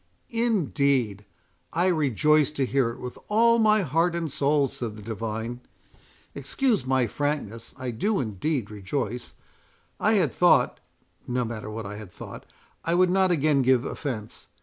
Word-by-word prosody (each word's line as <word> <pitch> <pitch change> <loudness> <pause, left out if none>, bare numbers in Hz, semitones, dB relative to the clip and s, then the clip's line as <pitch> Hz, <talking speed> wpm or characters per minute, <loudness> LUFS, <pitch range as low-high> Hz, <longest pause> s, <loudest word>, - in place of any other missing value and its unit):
"Indeed! 140 - +1 0.5
I 175 +2 +2
rejoice 150 - +3
to 140 -3 0
hear 130 -2 +1
it 115 - -8
with 125 0 -7
all 230 +2 +4
my 215 -2 +4
heart 165 +3 +1
and 165 -3 -2
soul," 140 0 +2
said 120 -6 -5
the 105 - -10
divine. 110 +2 -4 0.7
"Excuse 140 - 0
my 130 -1 +3
frankness—I 125 -1 -3
do 200 - 0
indeed 115 - -2
rejoice; 115 +4 -4 0.6
I - - +3
had - - +2
thought—no 125 0 0
matter 110 -2 -6
what 110 0 -5
I 105 +1 -6
had 105 -4 -10
thought; - - -10 0.4
I 170 - +1
would 180 0 +4
not 190 0 +3
again 155 -4 +3
give 130 0 +3
offence. 115 -8 -5
135 Hz, 145 wpm, -26 LUFS, 115-165 Hz, 0.7 s, all